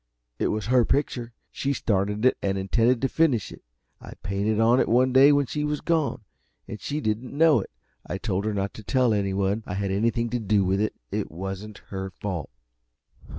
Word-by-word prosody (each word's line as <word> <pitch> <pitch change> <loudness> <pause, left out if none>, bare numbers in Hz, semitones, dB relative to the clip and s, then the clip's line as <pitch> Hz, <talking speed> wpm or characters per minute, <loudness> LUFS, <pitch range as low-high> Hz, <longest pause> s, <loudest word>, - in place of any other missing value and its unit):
"It - - +1
was 105 0 -2
her 125 0 +4
picture, 120 -3 -1 0.2
she 140 0 -1
started 105 -1 0
it 130 - +5
and 95 0 0
intended 115 +6 +1
to - - +4
finish 135 -9 +1
it. - - -12 0.4
I - - -10
painted 100 +2 0
on 115 +3 +4
it - - +1
one 125 +2 +3
day 135 +2 +7
when 145 -1 +3
she 150 +4 -3
was 150 -1 -1
gone, 155 -8 0 0.4
and 105 - -7
she 150 +1 -3
didn't 120 +2 -3
know 160 -4 +5
it. 95 - -6 0.3
I 90 - -4
told 100 -1 -2
her 110 - 0
not 100 0 -2
to 110 - -10
tell 125 +1 +2
anyone 100 +1 0
I 90 - -4
had 100 0 -2
anything 115 +3 0
to 120 - -1
do 105 -2 +2
with 95 +2 +1
it. 110 - -1 0.2
It - - -2
wasn't 95 +4 -7
her 95 -1 -4
fault." 90 -7 -4
110 Hz, 200 wpm, -25 LUFS, 100-130 Hz, 0.4 s, day